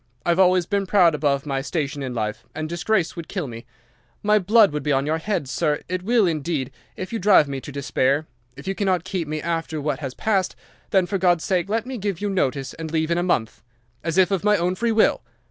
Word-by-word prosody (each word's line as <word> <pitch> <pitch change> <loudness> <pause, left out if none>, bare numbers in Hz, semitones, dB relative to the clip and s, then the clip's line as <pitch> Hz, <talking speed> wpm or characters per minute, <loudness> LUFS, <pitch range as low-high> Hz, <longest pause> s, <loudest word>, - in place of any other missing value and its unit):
I've 170 +1 +2
always 185 -1 +4
been 200 +1 -1
proud 180 -4 +5
above 145 -2 0
my 135 -2 -1
station 145 -1 -3
in 130 -2 -4
life, 110 0 -3
and 155 0 -3
disgrace 175 +2 0
would 170 -2 -7
kill 185 -5 -3
me. 115 -1 -9 0.6
My 210 0 +4
blood 210 +1 +5
will 150 - -1
be 150 +1 -2
on 135 0 +2
your 160 +2 0
head, 190 -5 -2
sir—it 155 +5 -1
will, 225 +2 +3
indeed—if 150 - -4
you 225 - -1
drive 185 -6 +5
me 135 -1 -4
to 145 - -8
despair. 140 +1 0 0.3
If 140 - -10
you 195 - 0
cannot 190 -4 0
keep 185 -3 -3
me 155 0 -4
after 165 -2 -2
what 150 +1 -2
has 135 -3 -5
passed, 195 -4 0 0.3
then 190 -2 +3
for 195 +2 -2
God's 175 -3 +3
sake 185 -1 0
let 225 +2 0
me 255 -2 -5
give 200 -4 -2
you 205 -1 -2
notice 140 -7 -1
and 160 0 -6
leave 160 0 0
in 170 - +2
a - - +1
month, 130 -11 -1 0.4
as 165 +1 -2
if 190 +1 +4
of 195 -1 0
my 210 0 +4
own 175 +1 0
free 230 +5 0
will. 220 - +3
170 Hz, 230 wpm, -23 LUFS, 145-190 Hz, 0.6 s, proud